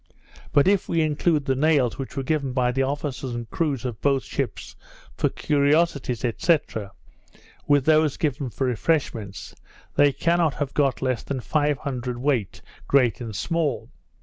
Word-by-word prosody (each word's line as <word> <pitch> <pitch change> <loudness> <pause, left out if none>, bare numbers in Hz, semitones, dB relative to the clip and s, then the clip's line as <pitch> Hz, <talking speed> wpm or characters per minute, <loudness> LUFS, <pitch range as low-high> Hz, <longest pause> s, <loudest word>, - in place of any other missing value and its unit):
But 145 +2 +4
if 200 -1 +2
we 165 -1 +2
include 155 0 +1
the 135 - +2
nails 140 -3 +2
which 135 +1 -6
were 135 - -1
given 140 -2 -1
by 125 -1 +2
the 135 +2 0
officers 135 -2 -3
and 120 -1 -5
crews 140 -7 -1
of 120 -4 -4
both 135 -2 +2
ships - - -4 0.4
for - - +1
curiosities, 145 -4 +1
&c. 170 -2 +5 1.1
with 145 -2 +3
those 155 -2 +3
given 145 -3 -1
for 125 +4 -2
refreshments, 120 - -2 0.4
they 145 0 +6
cannot 170 +1 +1
have 145 -2 -3
got 135 -5 +1
less 130 -3 0
than 140 -2 -4
five 145 +2 0
hundred 125 -4 -4
weight, 125 -7 -1 0.2
great 130 -4 +3
and 110 -3 -6
small. 160 - -1
140 Hz, 155 wpm, -24 LUFS, 125-150 Hz, 1.1 s, they